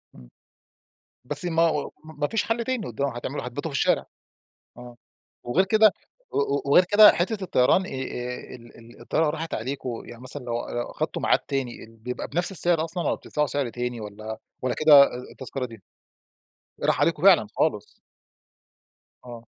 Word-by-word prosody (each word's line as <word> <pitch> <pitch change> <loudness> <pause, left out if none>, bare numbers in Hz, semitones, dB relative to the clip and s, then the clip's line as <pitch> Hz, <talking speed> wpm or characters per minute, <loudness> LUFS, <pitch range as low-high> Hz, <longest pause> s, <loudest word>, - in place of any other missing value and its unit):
إمم. - - -15 1.0
بس - - -3
ما 165 -1 +1
هو 155 -3 +1
ما 155 -2 -3
فيش 225 - 0
حل 230 +1 -1
تاني 255 -7 -2
قد 120 +4 -5
هتعملوا 130 -1 -3
هتباتوا 145 +6 -5
في 140 - -3
الشارع. - - +2 0.7
آه، 120 -1 -11 0.5
وغير 165 +11 +2
كده 215 +1 +5 0.4
و - - -2
و 140 0 0
وغير 160 +6 +5
كده 210 +3 +8
حتة 195 +4 -2
الطيران 185 +4 +3
آآ - - -8 0.6
ال 120 -1 -14
ال 115 +1 -16
الطيارة 155 -1 +1
راحت 160 +1 -4
عليكم، 125 0 -4
يعني 120 0 -12
مثلًا 130 +1 -6
لو 120 -1 -3
لو 120 - -2
أخدتم - - -3
ميعاد - - +4
تاني، 135 -4 -4
ال 115 0 -17
بيبقى 125 +3 -6
بنفس 175 +5 -2
السعر 170 -3 +2
أصلًا 170 +1 -4
والّا - - +1
بتدفعوا 150 0 -2
سعر 140 -3 -2
تاني 120 0 -4
والّا 110 +1 -7 0.2
والّا 130 -1 0
كده 150 -2 +8
أ - - +6
أ - - -7
التذكرة 130 0 -5
دي 115 -4 -13 1.0
راح - - +2
عليكم - - +1
فعلًا - - +6
خالص؟ - - -1 1.3
آه. 120 -2 -9
140 Hz, 170 wpm, -25 LUFS, 120-165 Hz, 1.3 s, كده